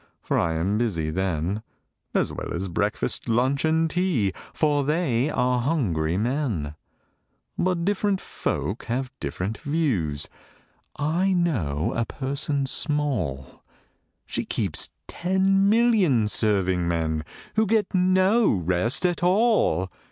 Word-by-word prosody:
For - - 0
I 85 -1 +1
am 95 +6 0
busy 85 -10 -1
then, 95 +2 -1 0.5
As - - +1
well - - -5
as 95 +2 -3
breakfast, 85 - -1
lunch, 130 +4 +2
and 160 +1 +2
tea, 160 - 0 0.2
For 145 -2 +1
they 145 -4 +1
are 125 -3 +1
hungry 90 - 0
men: 110 - -1 0.8
But 180 -2 0
different 200 0 +1
folk 100 - -3
have 130 +2 -2
different 100 +4 -4
views: 120 - -1 0.7
I 170 +7 +1
know 105 - 0
a 115 - 0
person 140 +2 -2
small 130 - -2 0.6
She - - -3
keeps - - -1 0.2
ten 190 +2 +2
million 210 - +3
serving 95 -5 +1
men, 80 -2 -1 0.3
Who 220 0 +3
get 215 -1 +1
no 185 +4 +4
rest 95 - +1
at 175 -1 0
all! 180 - +2
130 Hz, 120 wpm, -25 LUFS, -, 0.8 s, no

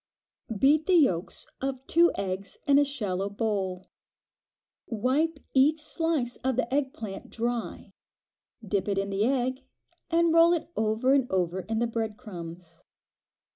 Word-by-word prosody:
Beat 295 +7 +4
the 375 - +4
yolks 190 - +2 0.2
of 265 -1 -3
two 340 +1 +4
eggs 195 0 -4
in 280 0 +5
a - - +5
shallow 205 -9 -2
bowl. 200 -3 -2 1.0
Wipe 270 +8 0 0.2
each 290 +4 +4
slice 305 -5 -1
of 260 -1 -1
the 255 0 -1
egg 275 -2 +1
plant 205 -6 -8
dry, 235 0 -4 0.7
dip 195 0 0
it 200 -1 0
in 195 0 -1
the 200 +2 +1
egg, 260 +1 0 0.5
and 335 -1 +3
roll 335 +1 +6
it 335 0 -3
over 220 +4 +2
and 265 -3 +2
over 180 -1 0
in 220 +4 -3
the 230 -1 -1
crumbs. 170 -3 -10
240 Hz, 140 wpm, -27 LUFS, 200-285 Hz, 1.0 s, roll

